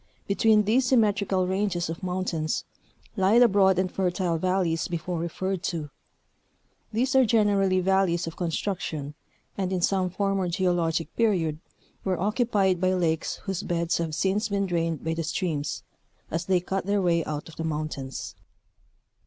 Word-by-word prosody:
Between 210 +1 +4
these 245 +5 +2
symmet 215 -6 +4
rical 185 -2 0
ranges 190 -2 0
of 165 +1 -5
mountains 180 -4 -2 0.5
lie 195 +2 +4
the 245 0 +8
broad 190 -3 +4
and 185 0 0
fertile 180 -2 0
valleys 180 -2 0
before 175 0 -3
referred 185 +2 -2
to. 155 -5 -3 1.0
These 250 +4 0
are 265 - +7
generally 205 -5 +3
valleys 190 -2 +2
of 165 0 -6
construction, 165 -4 -3 0.5
and 190 -1 -1
in 185 -1 -1
some 185 0 +1
former 195 0 0
geologic 170 -3 0
period 175 -9 +1 0.4
were 185 -3 -1
occupied 205 -3 +1
by 185 0 +3
lakes 165 -3 0
whose 195 -2 -3
beds 170 -4 -1
have 160 -2 -2
since 195 +6 0
been 200 -1 0
drained 165 -3 -1
by 160 - -1
the 165 - -2
streams, 155 -2 -2 0.5
as 170 +2 -2
they 185 -2 +2
cut 190 +1 -3
their 205 0 +2
way 170 -3 +2
out 150 -1 -4
of 165 - -13
the 165 - -3
mountains. 145 -9 -4
185 Hz, 155 wpm, -26 LUFS, 165-195 Hz, 1.0 s, the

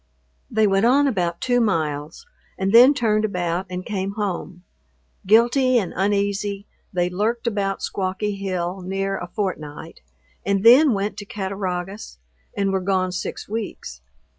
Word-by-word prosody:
They 220 -1 +2
went 195 +2 +3
on 280 +4 +4
about 175 -10 -1
two 245 -1 +2
miles, 155 - -2 0.3
and 190 +2 -1
then 250 +5 +8
turned 215 -4 +1
about 180 -2 -2
and 180 0 -5
came 200 -2 -3
home. 185 -3 -4 0.6
Guilty 240 +4 +4
and 195 -7 -1
uneasy, 200 0 -1 0.3
they 175 -2 0
lurked 215 +7 -1
about 200 -4 -1
Squawky 195 +2 -2
Hill 185 -1 -3
near 195 +1 -2
a 175 - -6
fortnight, 165 -6 -5 0.4
and 200 0 0
then 260 +4 +7
went 200 +1 -2
to 205 - -7
Cattaraugus, 190 - -4 0.4
and 195 -1 +1
were 190 -1 0
gone 185 -1 0
six 180 - -5
weeks. 200 - -6
195 Hz, 140 wpm, -22 LUFS, 185-215 Hz, 0.6 s, then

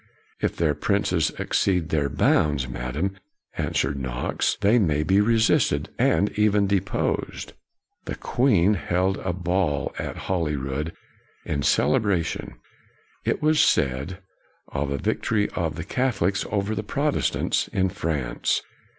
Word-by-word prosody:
' - - -35
" - - -33
If - - 0
their 80 -3 +1
princes 95 -3 +1
exceed 90 -4 +1
their 75 -3 +1
bounds, 75 -4 +2
Madam," 70 +11 -3 0.4
answered 70 +1 -1
Knox, 65 -2 -1
" - - -35
they 105 +4 +4
may 75 -7 +1
be 95 +6 +3
resisted, 115 +1 +2
and 100 - +3
even 105 -1 +2
deposed." 100 -1 -1 0.5
The - - -4
Queen 105 -7 +2
held 95 0 0
a 95 - -2
ball 90 -4 -1
at - - -4
Holyrood, 75 -3 -2 0.5
in 70 -2 -2
celebration 90 +2 +1 0.7
it - - 0
was 155 0 +3
said 70 +9 +1 0.5
of 70 +1 -2
a 70 - -1
victory 105 +7 0
of 80 -3 -2
the 80 - -5
Catholics 100 -6 0
over 100 +1 -1
the 105 - -2
Protestants 140 +7 0
in 95 -1 0
France. 75 -7 -1
90 Hz, 135 wpm, -24 LUFS, 75-100 Hz, 0.7 s, they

